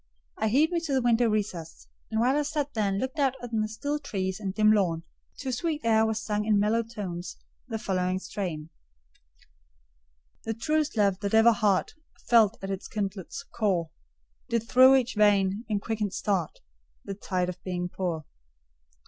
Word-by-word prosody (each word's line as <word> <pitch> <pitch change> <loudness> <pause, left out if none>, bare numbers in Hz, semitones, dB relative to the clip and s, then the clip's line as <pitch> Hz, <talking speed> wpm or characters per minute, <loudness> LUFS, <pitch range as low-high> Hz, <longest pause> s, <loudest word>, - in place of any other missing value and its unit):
I 220 - 0
hied 290 +9 +3
me 345 - +1
to 320 -4 -3
the 265 - +2
window 240 -1 +3
recess. 190 -7 -3 0.2
And 220 - -1
while 250 +4 +3
I 295 - +2
sat 295 -1 -2
there 215 -2 0
and 195 - -1
looked 260 +8 -3
out 270 -2 +2
on 225 -3 -1
the 215 - 0
still 285 +8 -3
trees 190 -8 -3
and 195 -3 -3
dim 215 +2 +4
lawn, 175 -6 +1 0.3
to 270 - -5
a - - -1
sweet 310 +4 -1
air 220 -1 +4
was 220 -1 -1
sung 210 -1 -1
in 210 -1 +3
mellow 215 +3 +2
tones 200 -6 -6 0.3
the 225 -3 -3
following 185 -3 -1
strain:— 180 -5 -5 1.7
"The 225 - -3
truest 305 +2 0
love 200 -3 +2
that 200 +1 -1
ever 225 +1 +7
heart 205 -4 +1 0.3
Felt 230 -2 +5
at 195 - -3
its 195 +1 -5
kindled 200 -3 -4 0.2
core, 185 -7 0 0.6
Did 230 -1 -1
through 260 +2 +7
each 260 -1 +1
vein, 205 0 +3
in 210 -2 +1
quickened 210 -2 -3
start, 190 -6 -1 0.4
The 200 - -4
tide 185 -2 -2
of 180 0 -7
being 180 -1 -3
pour. 175 -4 -3
215 Hz, 180 wpm, -27 LUFS, 190-235 Hz, 1.7 s, ever